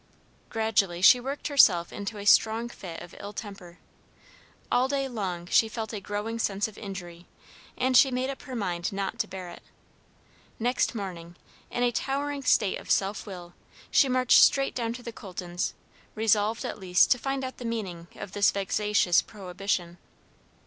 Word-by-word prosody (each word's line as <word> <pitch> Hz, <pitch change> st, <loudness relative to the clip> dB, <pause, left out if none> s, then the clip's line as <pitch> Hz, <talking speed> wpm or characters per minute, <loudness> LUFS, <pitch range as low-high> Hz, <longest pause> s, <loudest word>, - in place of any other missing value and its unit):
Gradually 220 Hz, -6 st, +1 dB
she 245 Hz, +6 st, +8 dB
worked 270 Hz, +4 st, -4 dB
herself 185 Hz, -, +4 dB
into 205 Hz, +1 st, -5 dB
a 200 Hz, -, -7 dB
strong 225 Hz, +3 st, +4 dB
fit 175 Hz, -8 st, -8 dB
of 175 Hz, -, -13 dB
ill 205 Hz, +1 st, -7 dB
temper. 195 Hz, -5 st, -9 dB, 0.9 s
All 250 Hz, +1 st, +3 dB
day 275 Hz, 0 st, -1 dB
long 190 Hz, -8 st, -4 dB
she 220 Hz, +5 st, +3 dB
felt 220 Hz, 0 st, -5 dB
a 210 Hz, -, -3 dB
growing 210 Hz, +3 st, -4 dB
sense 200 Hz, -1 st, 0 dB
of 215 Hz, -, -13 dB
injury, 180 Hz, -4 st, -8 dB, 0.5 s
and 255 Hz, 0 st, +1 dB
she 270 Hz, -, +7 dB
made 255 Hz, +1 st, -1 dB
up 270 Hz, -, -9 dB
her 260 Hz, -3 st, -8 dB
mind 175 Hz, -6 st, -2 dB
not 195 Hz, -1 st, -4 dB
to -, -, 0 dB
bear 185 Hz, -2 st, -7 dB
it. -, -, -12 dB, 1.0 s
Next 245 Hz, +1 st, 0 dB
morning, 175 Hz, -5 st, -6 dB, 0.3 s
in 245 Hz, -, -1 dB
a 245 Hz, -, +3 dB
towering 280 Hz, +3 st, -2 dB
state 215 Hz, -6 st, +2 dB
of -, -, -13 dB
self 195 Hz, +2 st, 0 dB
will, 175 Hz, -3 st, -9 dB, 0.4 s
she 275 Hz, -, +5 dB
marched 255 Hz, -1 st, +5 dB
straight 275 Hz, 0 st, +4 dB
down 230 Hz, -2 st, -2 dB
to 245 Hz, +1 st, -9 dB
the 235 Hz, -, -7 dB
Coltons, 180 Hz, -3 st, -5 dB, 0.4 s
resolved 220 Hz, 0 st, +1 dB
at -, -, -5 dB
least 180 Hz, -2 st, +3 dB
to 250 Hz, -, +4 dB
find 270 Hz, +1 st, -2 dB
out 260 Hz, 0 st, -5 dB
the -, -, -8 dB
meaning 195 Hz, -8 st, -4 dB
of 195 Hz, -, -8 dB
this 200 Hz, 0 st, +3 dB
vexatious 200 Hz, -2 st, +2 dB
prohibition. 185 Hz, -3 st, -4 dB
210 Hz, 170 wpm, -27 LUFS, 185-245 Hz, 1.0 s, she